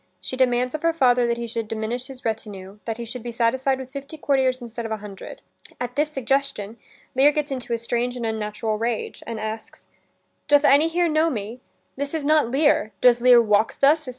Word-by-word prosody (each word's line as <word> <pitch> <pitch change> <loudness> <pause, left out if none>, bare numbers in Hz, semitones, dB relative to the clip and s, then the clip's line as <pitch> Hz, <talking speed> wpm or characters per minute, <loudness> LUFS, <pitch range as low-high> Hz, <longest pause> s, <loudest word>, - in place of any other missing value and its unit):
She - - -6
demands 250 -1 +1
of 310 - -4
her 330 0 +2
father 250 -6 +3
that 235 0 0
he 235 - -4
should 230 -1 -4
diminish 225 +3 -4
his 265 -1 -11
retinue; 205 -3 -5
that 225 -1 -3
he 235 - -5
should 240 +2 -7
be 240 - -6
satisfied 255 +3 +1
with 260 -1 -9
fifty 280 +3 -8
courtiers 265 -3 +1
instead 235 -1 -7
of 225 - -5
a 220 - -1
hundred. 210 - -10 0.4
At 245 0 -4
this 300 +1 +1
suggestion, 270 -6 -2 0.4
Lear 275 +3 +5
gets 295 -1 -2
into 255 -3 -5
a 235 - +1
strange 240 +2 -2
and 235 - -4
unnatural 215 0 -2
rage, 230 -1 -3
and 230 -2 -4
asks: 220 +1 -7 0.6
"Doth 290 0 +5
any 285 +4 +6
here 345 +1 +1
know 315 +1 +2
me? 225 -1 -5 0.4
This 285 +3 -3
is 305 -3 -3
not 305 -5 +3
Lear: 270 -6 +2
Does 245 -1 +5
Lear 250 -1 +7
walk 210 0 +1
thus? 295 0 +3
245 Hz, 205 wpm, -23 LUFS, 225-275 Hz, 0.6 s, Lear